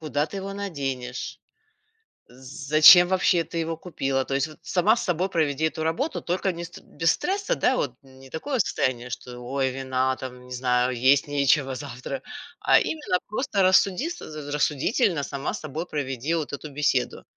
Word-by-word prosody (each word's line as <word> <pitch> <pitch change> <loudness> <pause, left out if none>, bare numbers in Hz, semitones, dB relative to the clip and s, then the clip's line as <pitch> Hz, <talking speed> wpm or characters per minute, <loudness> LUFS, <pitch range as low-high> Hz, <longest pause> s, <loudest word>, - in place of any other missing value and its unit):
Куда 150 -1 -1
ты 200 - -8
его 195 0 -5
наденешь? 135 -11 -5 0.9
Зачем 150 +7 +6
вообще 180 -2 +2
ты 170 - -7
его 165 -1 -2
купила? 135 -6 -2
То - - -4
есть 140 +3 +1
вот 155 - -14
сама 205 +6 +2
с - - -2
собой 180 0 0
проведи 155 -3 0
эту 160 0 0
работу, 165 - -1
только 185 +2 -1
не 170 0 -6
ст 170 - -11
без 165 0 0
стресса, 400 +6 -1
да 255 - +2
вот, 125 -4 -2
не 135 0 -16
такое 255 - -3
состояние, 130 - 0
что 125 0 -7
ой, 130 +2 -1
вина 130 0 -1
там, 125 -1 -8
не 125 - -15
знаю, 125 0 +1
есть 130 +4 +3
нечего 140 -1 +2
завтра, 135 - -6 0.4
а - - +5
именно 300 -12 -1
просто 210 -2 -1
рассуди 190 - +3
с 350 - -7 0.3
рассудительно 150 - +1
сама 140 0 -4
с 210 - -6
собой 155 +2 -5
проведи 140 0 -3
вот 160 -3 -2
эту 145 +2 -6
беседу. 140 -3 0
150 Hz, 175 wpm, -25 LUFS, 130-180 Hz, 0.9 s, Зачем